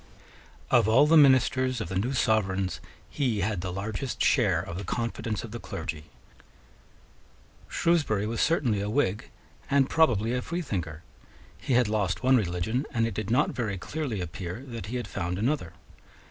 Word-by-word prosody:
Of 115 -4 +5
all 115 +6 +6
the 160 +2 +4
ministers 130 -3 +4
of 105 - -4
the 95 - -5
new 125 +7 -1
Sovereigns, 95 -6 +1 0.3
he 125 -8 -1
had 100 -2 -1
the 90 0 -4
largest 105 +7 -4
share - - +3
of 85 +2 -5
the - - -5
confidence 115 +1 -3
of 115 - -8
the 120 - -6
clergy. 75 -7 -6 1.6
Shrewsbury 145 -12 +1
was 115 +1 -2
certainly 125 -11 +1
a 100 - -2
Whig, 105 -5 0 0.4
and 140 -1 +3
probably 120 -8 +3
a 125 - 0
freethinker: 95 - -4 0.5
he 135 - -3
had 125 -2 +4
lost 105 -1 -1
one 130 +1 +5
religion; 110 - -1
and 115 -1 +1
it 115 - -2
did 105 +1 -4
not 120 - +2
very 105 -6 -3
clearly 130 - -4
appear 90 +6 -6
that 115 -5 -6
he 120 - -5
had 120 -3 -3
found 90 -1 -3
another. 115 - -1
110 Hz, 165 wpm, -27 LUFS, 95-130 Hz, 1.6 s, all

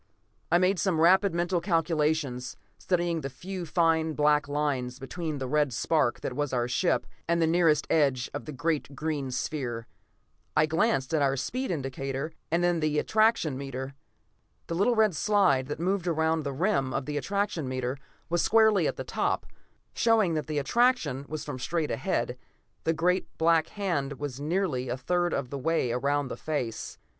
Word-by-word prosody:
I 175 - +6
made 185 +1 +2
some 185 -5 +1
rapid 190 +4 +5
mental 175 0 0
calculations, 155 -7 0 0.2
studying 175 -2 0
the 135 - -4
few 180 +6 -6
fine 160 -1 +2
black 150 -1 +3
lines 140 -4 -1
between 155 +3 -4
the 135 - -3
red 150 0 +2
spark 135 +1 +1
that - - -3
was 145 +1 -2
our 120 -2 0
ship, 175 +8 +1 0.2
and 170 0 +2
the 165 - +4
nearest 160 -2 +3
edge 135 -6 +2
of 145 - -5
the 150 - -6
great 150 0 -2
green 150 -3 -2
sphere. 125 -3 -3 0.7
I 155 - +6
glanced 155 -3 +1
at 155 - +2
our 135 -1 +2
speed 255 - -2
indicator 135 0 -3 0.2
and 175 0 +2
the 155 -1 +1
attraction 215 - +2
meter. 135 0 -5 0.7
The - - -4
little 205 +8 +2
red 215 -5 +3
slide 180 -8 +3
that 150 +1 -4
moved 180 +1 0
around 160 -1 +1
the 140 - -1
rim 135 -3 0
of 135 -1 -1
the 150 0 -3
attraction 195 -3 -1
meter 130 0 -2 0.3
was 175 0 +1
squarely 220 -2 +4
at - - -2
the - - -5
top, - - -1 0.5
showing 220 -7 +3
that 155 -3 -2
the 155 -1 -2
attraction 190 - +1
was 155 0 -5
from 130 - -5
straight 160 +3 -1
ahead; - - -1 0.5
the 165 - +3
great 180 +3 +1
black 165 0 +3
hand 170 -9 -2
was 140 -2 -6
nearly 150 -6 -1
a 125 - -2
third 175 +6 0
of 125 - -2
the 140 - -4
way 160 -4 +1
around 140 +3 0
the - - -5
face. 130 -8 -4
155 Hz, 175 wpm, -28 LUFS, 135-175 Hz, 0.7 s, I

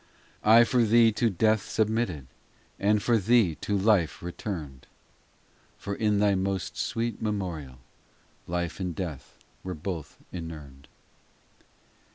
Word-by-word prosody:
VII - - -31
I 115 +2 +9
for 120 +1 +2
thee 115 +1 +5
to 115 +2 +1
death 110 +2 +2
submitted, 110 - -1 0.5
And 105 +1 +2
for 120 -2 +3
thee 110 -3 +3
to 105 - 0
life 95 -6 +2
returned; 85 - -6 0.9
For 100 - -5
in 105 0 +1
thy 100 0 +3
most 95 -1 -2
sweet 115 -2 -2
memorial 90 - -3 0.7
Life 85 0 -3
and 90 -3 -3
death 85 -8 -6 0.3
were 95 -1 -4
both 80 -2 -6
inurned. 75 -6 -8
100 Hz, 125 wpm, -27 LUFS, 85-110 Hz, 0.9 s, I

